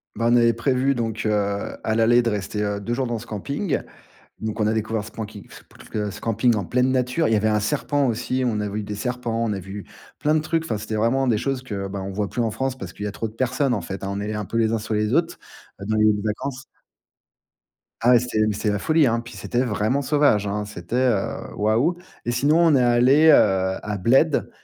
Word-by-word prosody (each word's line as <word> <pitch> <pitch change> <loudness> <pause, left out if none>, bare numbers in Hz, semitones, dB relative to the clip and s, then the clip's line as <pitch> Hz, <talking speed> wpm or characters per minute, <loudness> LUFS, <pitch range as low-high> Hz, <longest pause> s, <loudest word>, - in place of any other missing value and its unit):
Bah, 115 - -1
on 120 - +5
avait 115 -1 +5
prévu 130 +3 +1
donc 115 -3 -3
heu, 110 - +2 0.5
à 110 - +1
l'aller 120 +2 +4
de 115 - 0
rester, 105 0 -3
heu, 100 0 -2
2 120 +4 -3
jours 130 0 -1
dans 120 -1 -2
ce 115 - -9
camping. 140 - -2 0.6
Donc, 110 0 -4
on 105 - +2
a - - +1
découvert 110 -1 -2
ce 110 - -10
camping, 105 -3 -8
ce - - -13
pt 105 -1 -6
ce - - -10
camping 115 +1 +2
en 100 -3 -1
pleine 125 +5 +1
nature. 130 +5 +1
Il - - +1
y - - +4
avait 110 +1 +2
un 105 0 +2
serpent 145 +3 0
aussi, 125 +2 -1
on 105 -3 0
a 105 - -2
vu 105 +1 -3
des 105 - -5
serpents, 115 +1 -2
on 110 - -1
a 100 - -3
vu 100 +2 -8 0.4
plein 150 +1 +2
de - - +2
trucs. 165 +1 -1
Enfin, 110 -10 -2
c'était 110 +1 -5
vraiment 125 +5 +1
des 110 -4 +2
choses 135 0 -2
que, 100 -5 -5
bah 100 0 -5
on 95 - -5
voit 100 0 -2
plus 120 - -2
en 115 - 0
France 130 +3 -2
parce 90 -6 -7
qu'il 105 - -7
y - - -1
a - - -6
trop 115 - -3
de 110 - -13
personnes 130 +1 0
en 100 - -2
fait, 95 +3 -6
on 100 +1 -3
est 105 +1 -3
un 105 - -3
peu 115 - -5
les 110 -1 +2
uns 115 - +1
sur 110 0 -4
les 105 0 0
autres, - - +1 0.5
dans 110 0 0
les 110 - +3
lieux 110 - +6
de 105 - -3
vacances. 130 +5 -3 1.4
Ah 120 - +4
ouais, 120 - +7
c'était, 120 -2 -2
mais, 105 - 0
c'était 105 0 0
la 105 - -1
folie 155 +2 +3
hein. 115 -1 +1
Puis 120 - -11
c'était 120 - -1
vraiment 115 +4 0
sauvage 140 -8 +2
hein. 105 +1 -2
C'était 105 +1 -6
heu, 125 -6 0
waouh. 115 +12 +1 0.3
Et 120 - 0
sinon, 145 +7 +2
on 165 -3 +5
est 130 - +4
allé, 125 +6 +5
heu, 155 - +9 0.5
à 105 -1 -3
Bled, 135 - +3
115 Hz, 255 wpm, -23 LUFS, 105-130 Hz, 1.4 s, heu